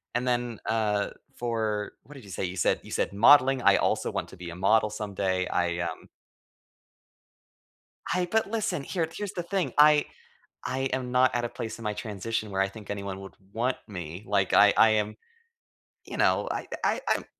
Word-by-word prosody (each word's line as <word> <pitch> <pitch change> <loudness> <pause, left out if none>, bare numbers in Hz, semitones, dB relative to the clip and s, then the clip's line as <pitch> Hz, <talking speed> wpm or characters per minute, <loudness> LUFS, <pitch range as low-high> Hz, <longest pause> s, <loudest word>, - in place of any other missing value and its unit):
And 125 +1 0
then, 120 -2 -1
uh, 105 -2 0 0.3
for 110 -3 -2
what 145 - -14
did 130 - -11
you - - -13
say? 90 - -3
You 90 +1 -5
said - - +2
you - - -12
said - - -1
modeling, 130 +4 +6
I - - +6
also - - 0
want - - -3
to 95 - -13
be 85 -1 -7
a - - -8
model 105 +3 +3
someday. 100 -3 -2
I, 85 0 0
um 85 - -5 2.0
I 180 -1 +1
but 220 -2 +1
listen, 220 -10 -1
here 165 -1 -1
here's 205 -1 -5
the 175 - -3
thing. 190 0 -2
I 150 0 +6 0.6
I 130 - -2
am 125 -1 -2
not 130 0 +3
at 120 0 0
a - - -3
place 110 0 -6
in 115 - -10
my 105 0 -1
transition 110 0 -4
where 95 0 0
I 95 - +2
think 105 0 -12
anyone 100 -1 -4
would 95 0 -11 0.2
want 125 +4 0
me. 90 -1 -7
Like 100 -2 +1
I 105 -1 +7
I 110 - +7
am 105 0 0 0.9
you - - -7
know, - - +2
I - - -3 0.2
I - - +1
I'm - - -4
110 Hz, 195 wpm, -27 LUFS, 100-130 Hz, 2.0 s, I